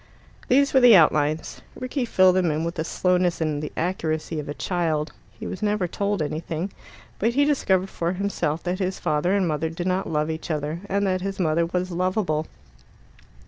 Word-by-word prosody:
These 275 +2 +3
were 265 - +6
the 245 -4 +8
outlines. 155 -2 +2
Rickie 255 +1 -3
filled 185 -5 +4
them 185 -2 +2
in 155 +1 -1
with 170 0 -2
the 160 - -3
slowness 180 +1 +1
and 155 -2 -1
the 150 - -5
accuracy 160 -2 -2
of 150 - -6
a 145 - -4
child. 165 -4 -1 0.3
He - - -6
was 185 - -5
never 210 -3 0
told 200 0 -1
anything, 160 +4 -4 0.5
but 230 +3 +1
he 285 +1 +4
discovered 195 -10 +1
for 170 +1 -2
himself 175 -5 -2
that 180 +1 -2
his 190 -1 -1
father 155 +6 +1
and 195 -3 +2
mother 155 0 -1
did 165 +2 -5
not 185 0 0
love 155 0 0
each 160 +2 -6
other, 155 +1 -2
and 200 +1 +1
that 185 -1 0
his 195 +1 -4
mother 165 -1 +2
was 180 +1 -2
lovable. 180 -3 0
175 Hz, 190 wpm, -24 LUFS, 160-195 Hz, 0.5 s, the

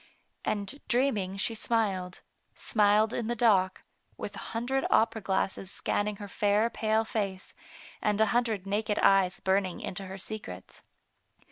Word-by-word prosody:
And 205 +7 -3
dreaming 220 -7 +1
she 215 +3 +1
smiled, 200 -5 -1 0.3
smiled 210 +1 +3
in 235 - -2
the 240 - -1
dock, 195 -5 +3 0.3
with - - -6
a - - -7 0.2
hundred 265 +3 0
opera 220 0 +3
glasses 190 -1 -1
scanning 205 +1 -1
her 205 0 -8
fair 210 +3 +2
pale 220 0 +1
face, 195 -4 -3 0.5
and 210 -1 +1
a 220 - +6
hundred 225 -5 +1
naked 210 +1 -1
eyes 195 -1 +4
burning 190 -1 0
into 195 +1 -5
her 190 +1 -7
secrets. 185 - -8
205 Hz, 140 wpm, -29 LUFS, 190-225 Hz, 0.5 s, a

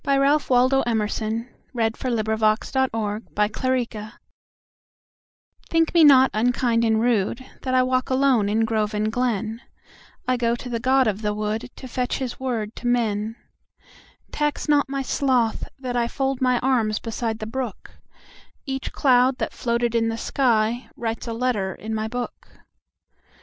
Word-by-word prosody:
Ralph 280 +1 +2
Waldo 255 +2 +4
Emerson 220 +1 -1 0.3
764. 220 -1 0
The 210 - +3
Apology 245 +2 -1 1.7
THINK 330 -1 +2
me 335 -2 +6
not 265 -3 +7
unkind 235 +1 +1
and 220 -1 +3
rudeThat 240 +3 -1
I 255 - +5
walk 255 0 0
alone 260 -6 +3
in 225 +2 +2
grove 215 -1 -1
and 215 +1 0
glen;I 235 +2 -4
go 235 -1 +1
to 245 - -8
the 235 -1 -2
god 260 +2 +3
of 215 -1 -1
the 210 -1 -1
woodTo 220 +5 -4
fetch 250 0 -2
his 255 -3 -5
word 230 -5 -3
to 245 - -4
men. 225 -2 0 1.0
Tax 295 -1 -1
not 290 -2 +3
my 275 0 -2
sloth 255 -5 0
that 255 -2 -4
IFold 265 +3 -1
my 255 -1 +3
arms 230 -5 +1
beside 225 -1 -3
the 215 - -6
brook; 240 -2 -5 0.7
Each 270 -1 -4
cloud 255 -1 +3
that - - -3
floated 235 -1 -1
in 225 -1 +2
the 225 - -2
skyWrites 230 -1 -1
a 230 - -3
letter 225 -6 -1
in 220 +1 -6
my 220 0 -1
book. 245 +1 -6
240 Hz, 140 wpm, -23 LUFS, 220-260 Hz, 1.7 s, not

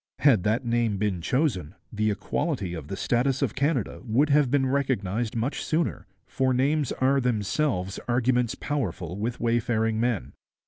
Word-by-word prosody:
Had 130 -9 +5
that 110 +6 0
name 115 -3 +1
been 95 -4 -1
chosen, 105 - 0 0.2
the 110 0 +1
equality 105 - -2
of 80 -4 -6
the 95 - -5
status 130 +3 +1
of 125 - 0
Canada 140 -4 -1
would 130 +5 +2
have 145 -2 +4
been 135 0 +2
recognized 120 -5 -1
much 115 +5 -1
sooner, 155 - -1 0.2
for 130 0 0
names 140 +1 +1
are 135 +1 +2
themselves 110 -3 -1
arguments 125 0 +1
powerful 95 - -3
with 115 +4 -3
wayfaring 115 -1 +1
men. 110 - -1
120 Hz, 150 wpm, -26 LUFS, 105-135 Hz, 0.2 s, Had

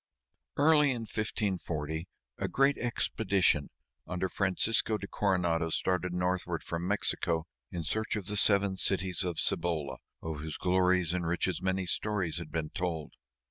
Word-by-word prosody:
Early 150 0 +5
in 125 -3 -1
1540 90 -7 -2 0.3
a - - 0
great 135 +1 +3
expedition 100 -9 +1 0.4
under 90 +1 -1
Francisco 105 +4 +1
de 100 - -6
Coronado 85 -5 +1
started 90 +2 0
northward 90 -1 -1
from 85 +1 -3
Mexico 85 -5 0 0.3
in 85 - -3
search 110 +7 -1
of 105 -3 -3
the 105 - -3
Seven 100 -1 +4
Cities 95 -1 0
of 90 -3 -2
Cibola, 80 -6 0 0.3
of 80 -2 -4
whose 80 0 -5
glories 90 -2 +3
and 90 -2 -1
riches 90 +2 0
many 95 0 0
stories 90 -3 -1
had 85 -3 -8
been 80 -2 -2
told. 85 -4 -3
90 Hz, 140 wpm, -31 LUFS, 85-100 Hz, 0.4 s, Early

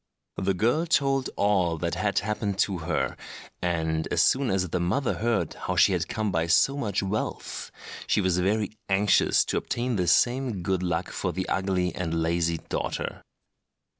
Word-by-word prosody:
The 95 0 0
girl 120 - +1
told 135 -4 +2
all 95 -5 +2
that 85 +1 -2
had 105 -1 -1
happened 105 -1 -1
to 95 -2 +1
her; 85 +2 -1 0.5
and 80 -2 -1
as - - +2
soon 135 -1 +2
as 95 -2 0
the 90 - -1
mother 95 +10 0
heard 110 -8 0
how - - -4
she - - +5
had - - -1
come 110 -2 -2
by 80 -1 0
so 135 +10 +4
much 105 -8 -1
wealth, 100 +3 -3 0.4
she - - +2
was 95 -2 +1
very 105 +3 0 0.2
anxious 95 +1 +3
to - - -1
obtain 120 -1 -2
the 90 -2 0
same 120 +2 +2
good 95 0 0
luck 90 -1 -2
for - - -2
the 95 0 -3
ugly 95 -2 0
and 85 -2 -2
lazy 85 0 +1
daughter. - - -4
95 Hz, 170 wpm, -26 LUFS, 85-110 Hz, 0.5 s, she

